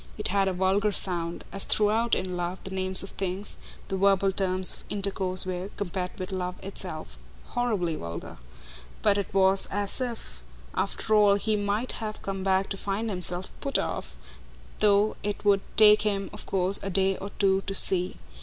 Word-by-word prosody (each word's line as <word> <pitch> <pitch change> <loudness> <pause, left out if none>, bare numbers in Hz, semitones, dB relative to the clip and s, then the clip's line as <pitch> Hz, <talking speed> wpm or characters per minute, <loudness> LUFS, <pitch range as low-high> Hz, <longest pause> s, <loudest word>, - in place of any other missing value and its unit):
It - - -1
had 195 0 +1
a 190 - 0
vulgar 190 +3 +1
sound 175 -4 -1
as 195 - -3
throughout, 220 +2 +2
in 185 -1 -3
love, 175 +1 -3
the 195 - -7
names 190 0 +3
of 195 - -7
things, 195 +1 -3 0.3
the 195 - -3
verbal 195 0 +3
terms 185 -1 +6
of - - -12
intercourse, 190 -2 -1
were, 185 +1 -4
compared 180 -1 -4
with 185 +1 -5
love 180 -1 -3
itself, 180 - -7 0.3
horribly 210 -9 -1
vulgar; 85 - -7 0.7
but 205 -1 +3
it 200 - -5
was 195 0 +3
as 205 +5 -3
if, 230 - -6 0.3
after 220 - -1
all, 205 -2 +5
he 215 +1 0
might 205 +4 -1
have 215 -1 -5
come 195 -1 -4
back 190 0 +1
to 195 - -3
find 205 +3 -3
himself 180 0 -5
"put 275 -1 0
off," - - -4 0.6
though 210 0 +3
it 205 0 -4
would 200 -1 +4 0.2
take 215 -1 +7
him 200 -2 -2
of - - -8
course 190 +1 +3
a 195 - -4
day 195 0 +2
or 200 - -7
two 195 -1 +2
to 195 - -2
see. 185 -1 +4
195 Hz, 180 wpm, -26 LUFS, 185-205 Hz, 0.7 s, take